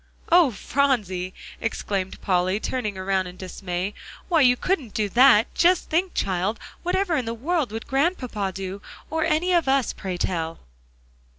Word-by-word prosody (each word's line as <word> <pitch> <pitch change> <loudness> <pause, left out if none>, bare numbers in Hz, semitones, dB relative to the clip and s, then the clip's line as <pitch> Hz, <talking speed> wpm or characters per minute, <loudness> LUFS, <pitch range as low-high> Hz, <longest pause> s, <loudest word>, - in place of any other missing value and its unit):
"Oh, 345 -4 +7
Phronsie!" 210 -7 0 0.3
exclaimed 195 -4 -3
Polly, 185 +1 +1
turning 215 -5 -3
around 190 0 0
in 180 0 -10
dismay, 185 +1 -4 0.4
"why, 330 -4 +4
you 250 -2 +6
couldn't 290 - -1
do 215 -1 +1
that. 240 -1 +5
Just 355 +1 +3
think, 355 +3 +1
child, 190 +3 -1 0.2
whatever 360 -1 0
in 260 -5 -1
the 230 +1 -3
world 295 +1 -1
would 225 +1 -5
Grandpapa 265 - 0
do, 190 +1 -6 0.3
or 320 0 0
any 330 +3 +1
of 340 -5 +3
us, 270 -3 +2
pray 185 -3 -5
tell?" 165 -2 -2
225 Hz, 155 wpm, -24 LUFS, 190-310 Hz, 0.4 s, Oh